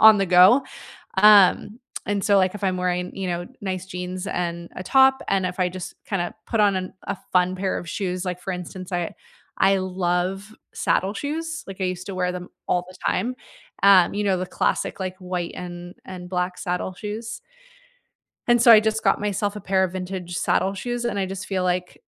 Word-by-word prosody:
on 220 -1 +9
the 195 - +1
go, 185 +9 +6 0.5
um, 210 +2 +6 0.3
and 200 -1 0
so, 200 -1 +4
like, 185 +1 +2
if 205 - -8
I'm 185 -1 +1
wearing, 180 0 -2
you 195 -1 -3
know, 175 0 -2 0.2
nice 185 -2 -3
jeans 180 0 -5
and 170 -3 -3
a - - -5
top, 265 +4 +5
and 195 -1 +1
if 180 +1 -4
I 180 -1 +2
just 185 0 -7
kinda 185 -1 -2
put 225 - -1
on 205 -2 +4
an 185 0 -4
a - - -3 0.2
fun 180 0 +3
pair 190 0 -1
of 170 - -7
shoes, 185 -1 -3
like 180 -1 -3
for 190 - -4
instance, 180 +1 -7
I 175 -2 -2 0.5
I 195 0 +5
love 185 +3 -2 0.2
saddle 195 +2 0
shoes, 325 +6 -4
like, 195 0 -8
I - - +1
used 180 -1 -3
to 195 - -5
wear 180 0 0
them 180 0 -6 0.2
all 180 0 +1
the 185 - -13
time, 250 +2 0 0.5
um, 195 -3 +6
you 205 +1 -1
know, 195 -2 +2
the 185 - -2
classic, - - -1
like, 185 0 -4
white 180 -2 -3
and 175 0 -8
and 180 -1 -8
black 180 0 -2
saddle 180 0 -3
shoes. 215 +4 -6 1.1
And 240 -1 +4
so, 235 - +8
I 220 - +10
just 220 0 -1
got 195 - +2
myself 205 0 -1
a 210 - -6
pair 190 0 +2
of 185 - -1
vintage 180 -1 -5
saddle 190 +2 +1
shoes, 240 +4 -3
and 205 -4 -1
I 195 - 0
just 190 0 -6
feel 190 -2 -1
like, 180 0 -2
185 Hz, 205 wpm, -23 LUFS, 180-205 Hz, 1.1 s, I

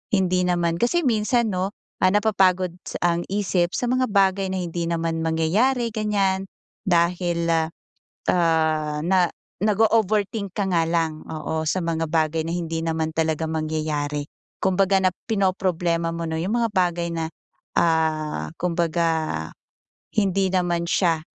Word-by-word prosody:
hindi 185 -1 +2
naman 170 -1 +1
kasi 245 +9 +2
minsan 230 -1 +2
'no, 190 +2 -2 0.3
ah, 185 - +5
napapagod 185 -4 +2
sa - - -5 0.2
ang 170 - -2
isip 190 -3 0
sa 245 - -1
mga 255 +1 +2
bagay 195 -1 +3
na 185 - -1
hindi 170 0 -3
naman 165 -1 -1
mangyayari, 210 +11 +2
ganiyan. 200 -3 0 0.4
Dahil, 170 -1 +1
ah, 160 -1 +2 0.6
ah, 160 -3 +1
na 180 +1 +3 0.3
nag-o-overthink 210 -1 +1
ka 205 - 0
nga 170 -3 +3
lang, 165 -2 -1
oo, 160 0 -3
sa 185 - +1
mga 165 -1 -1
bagay 160 0 +1
na 165 - -2
hindi 165 -2 -2
naman 160 -1 -1
talaga 160 0 0
mangyayari. 155 -2 -2 0.4
Kumbaga 190 +1 +3
na 185 -1 +3 0.2
pinoproblema 180 -5 +1
mo 170 0 -3
'no 160 0 -3
'yong 185 +6 -1
mga 230 - +1
bagay 175 -2 +1
na, 165 -1 -2 0.5
ah, 155 - +1
kumbaga 165 - 0 0.6
hindi 195 -2 +2
naman 175 -2 0
siya, 165 -4 +2
175 Hz, 140 wpm, -23 LUFS, 160-195 Hz, 0.6 s, ah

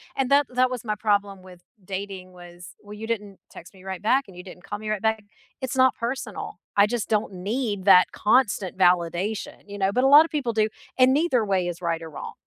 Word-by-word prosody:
and 270 -1 -1
that 285 -1 +4
that 255 0 +1
was 245 -2 -5
my 215 -2 -2
problem 200 -3 -1
with 180 -1 -15 0.2
dating 190 -1 -7
was, 175 0 -13
well, 205 0 -12
you 220 +1 -7
didn't 210 -4 -4
text 175 - -13
me 185 - -17
right 190 -1 -6
back 260 +6 +2
and 185 - -15
you 180 - -10
didn't 180 -1 -13
call 205 +1 -6
me 215 0 -6
right 215 -2 -2
back. 220 -1 0 0.4
It's 260 0 -4
not 260 0 +4
personal. 235 -6 -5 0.2
I 200 +1 +5
just 235 -2 -3
don't 210 -2 0
need 205 +1 -3
that 185 -2 +6
constant 210 -4 +1
validation, 180 +3 0
you 205 0 -8
know, 195 0 +1
but 250 - +1
a - - +5
lotta 300 +4 +7
people 265 -7 -2
do, 215 0 +2 0.3
and 255 +1 +5
neither 275 -7 +1
way 190 -3 0
is 175 0 -6
right 165 -1 -1
or 160 - -8
wrong. 150 - -8
205 Hz, 225 wpm, -24 LUFS, 185-240 Hz, 0.4 s, lotta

